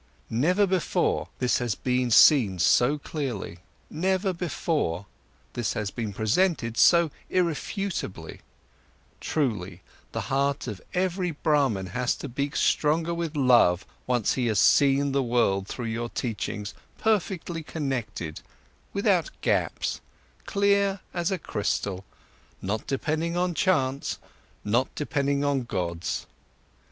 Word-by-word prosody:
Never 175 - +3
before, 185 -3 0
this 125 - +1
has 120 -5 -1
been 125 -1 0
seen 115 - +6
so 120 - +4
clearly; 130 - -5 0.3
never 190 +3 0
before, 155 - -2 0.5
this 120 -3 -1
has 105 -2 -3
been 110 -1 -4
presented 115 - +1
so 170 +3 +5 0.2
irrefutably; 170 - -2 0.8
truly, 100 - -2 0.3
the - - -3
heart 140 +1 0
of 105 -7 -6
every 180 0 0
Brahman 145 - +1
has 125 -1 0
to - - -7
beat 140 +4 -3
stronger 160 +3 +2
with 170 -2 -3
love, 120 -10 +4 0.2
once 125 -4 +1
he 125 -2 0
has 110 -2 +1
seen 140 +7 +4
the 140 0 +2
world 115 -6 +1
through 120 - -5
your 115 +1 -3
teachings 105 -4 -4 0.2
perfectly 190 -6 0
connected, 120 - -4 0.5
without - - +2
gaps, - - 0 0.5
clear 200 -1 +2
as 175 -1 0
a 190 - 0
crystal, 100 - -2 0.6
not 105 +3 -3
depending 160 +5 -1
on 180 0 +1
chance, 140 -6 +1 0.5
not 120 +5 +2
depending 140 -1 0
on 140 -2 +1
gods. 90 -7 -3
135 Hz, 120 wpm, -26 LUFS, 110-170 Hz, 0.8 s, seen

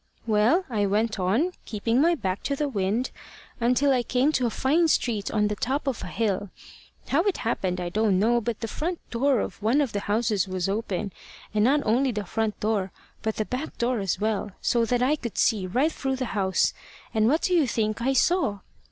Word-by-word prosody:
"Well, 230 - +3
I 210 -5 0
went 215 +2 0
on, 220 - +1
keeping 230 +4 0
my 340 +2 +4
back 190 - -3
to 280 - 0
the 295 +1 -1
wind, 215 0 -1 0.5
until 250 +4 +3
I 255 -2 +3
came 255 +4 +1
to 255 -5 +1
a - - 0
fine 300 +9 +2
street 225 -9 0
on 210 -1 +1
the 210 - -2
top 265 +8 -2
of 270 -4 -2
a - - -5
hill. 205 -3 -1 0.6
How 290 - +3
it 405 - +1
happened 185 -5 -1
I 175 -1 -3
don't 210 0 +2
know, 235 +4 +3
but 230 -1 -3
the 225 - -2
front 335 - -3
door 260 +1 +2
of 190 - -6
one 230 +7 +3
of 280 -5 +1
the 205 - -2
houses 210 -1 0
was 185 -1 -2
open, 200 -1 -2 0.4
and 210 -1 +2
not 285 +5 +3
only 250 +5 +2
the 210 -2 -4
front 220 +2 -2
door, 205 -3 0 0.3
but 220 -1 -2
the 215 - -1
back 255 +7 -5
door 240 0 0
as 190 -2 -1
well, 210 -2 -1
so 235 -1 +2
that 245 +1 +1
I 280 +4 +3
could 235 -6 -6
see 205 -5 +2
right 260 - +1
through 270 -3 -2
the 260 0 -2
house 190 -3 +1 0.4
and 220 -1 +3
what 310 +7 +2
do 365 - +1
you 325 -6 +4
think 215 -1 -1
I 265 +3 +1
saw? 260 - +2
230 Hz, 215 wpm, -26 LUFS, 205-265 Hz, 0.6 s, my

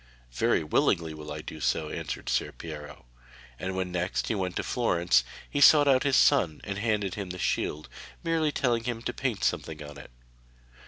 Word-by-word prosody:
'Very - - +2
willingly 80 +1 +1
will 75 -1 -8
I 75 +1 -5
do 80 - -8
so,' 75 +1 0
answered - - -5
Ser - - 0
Piero, 75 -5 -9 0.5
and 95 0 -3
when 95 -1 -2
next 90 +2 -1
he - - +1
went 95 -4 -2
to - - -1
Florence 85 - +2 0.2
he 145 - -2
sought 145 0 +8
out 130 -2 +5
his 140 -2 +2
son 100 - +4
and 100 -1 -4
handed 105 -4 0
him 100 -3 -5
the 90 - -5
shield, 75 -3 -1 0.4
merely 165 -2 +1
telling 120 -5 0
him 120 -2 -3
to - - -2
paint 125 -7 -2
something 80 -2 -1
on 75 -1 -10
it. - - -12
95 Hz, 190 wpm, -28 LUFS, 80-120 Hz, 0.5 s, sought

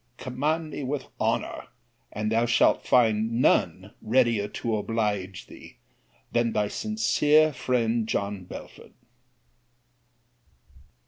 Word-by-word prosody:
Command 155 +5 -2
me 145 - -5
with 135 +1 -3
honour, - - -2 0.4
and 105 +1 -3
thou 115 +1 +2
shalt 115 - +3
find 115 -1 +2
none - - +1
readier 115 -2 +2
to 115 +1 -3
oblige 105 -4 -2
thee - - -14 0.5
than 120 -1 +1
Thy 105 - +1
sincere 135 +10 +2
friend, 115 -3 0
JOHN 100 -3 -3
BELFORD. - - -11
115 Hz, 105 wpm, -26 LUFS, 105-130 Hz, 0.5 s, shalt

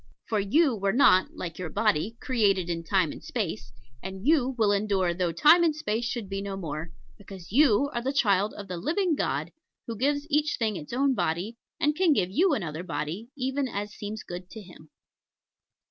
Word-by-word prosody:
For 215 - 0
you 260 +7 +3
were 200 -1 0
not, 190 -7 +4
like 170 -1 -6
your 180 -3 -4
body, 195 +10 0
created 195 -8 +1
in 165 0 -3
Time 180 -2 +1
and - - -10
Space; - - -4 0.3
and 190 +2 -7
you 265 -4 +3
will 215 -3 +3
endure 200 -3 +1
though 175 -1 -1
Time 305 - +6
and 320 -3 +2
Space 230 -5 -2
should 235 -3 -3
be 195 0 -4
no 200 -1 -5
more: 160 -2 -5 0.3
because 190 -3 -11
you 280 +1 +4
are 240 - -2
the 260 +3 -1
child 210 -7 +2
of 200 - -8
the 180 -1 -5
Living 345 - 0
God, - - -2 0.3
who 230 - -5
gives 285 +5 0
to 300 -1 -2
each 300 0 +1
thing 220 -3 0
its 150 -4 -8
own 270 +2 +2
body, 200 +4 -2 0.2
and 295 +1 +2
can 345 -2 +4
give 185 -8 0
you 335 - +3
another 160 - -4
body, 165 +6 -4
even 265 +1 -1
as 205 -2 -5
seems 215 +1 -6
good 180 +1 -8
to 220 - -9
Him. 170 -4 -15
205 Hz, 200 wpm, -27 LUFS, 185-270 Hz, 0.3 s, Time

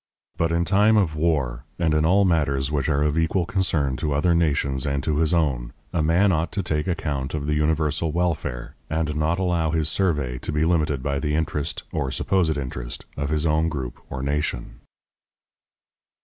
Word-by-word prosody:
But 85 0 0
in 85 +1 +1
time 105 +4 +4
of 85 -7 +2
war, 70 -7 0
and 80 -3 +1
in 75 0 +2
all 95 +4 +4
matters 70 -5 +1
which 75 0 0
are 75 -1 +2
of 75 +1 +1
equal 85 +2 +1
concern 80 -8 0
to 75 +3 -1
other 85 +4 +3
nations 70 -5 +1
and 70 -1 -1
to 75 +1 0
his 80 0 +2
own, 70 -8 0 0.2
a 85 - +1
man 85 +6 +3
ought 80 0 0
to 100 - -1
take 75 -3 -1
account 75 -6 -2
of 75 -2 -3
the 75 - 0
universal 75 +1 +1
welfare, 75 -7 -2 0.2
and 80 -1 -1
not 80 +3 +1
allow 90 -4 +1
his 80 -1 +1
survey 75 -9 0
to - - -4
be 75 +1 +1
limited 75 -5 +1
by 70 0 -1
the 75 +2 -1
interest, 80 -1 -2
or 65 - -1
supposed 80 +4 +1
interest, 65 -3 -5
of 70 0 -3
his 75 +1 0
own 80 +1 +2
group 65 -6 -5
or 65 0 -5
nation. 70 -3 -2
75 Hz, 190 wpm, -24 LUFS, 70-85 Hz, 0.2 s, time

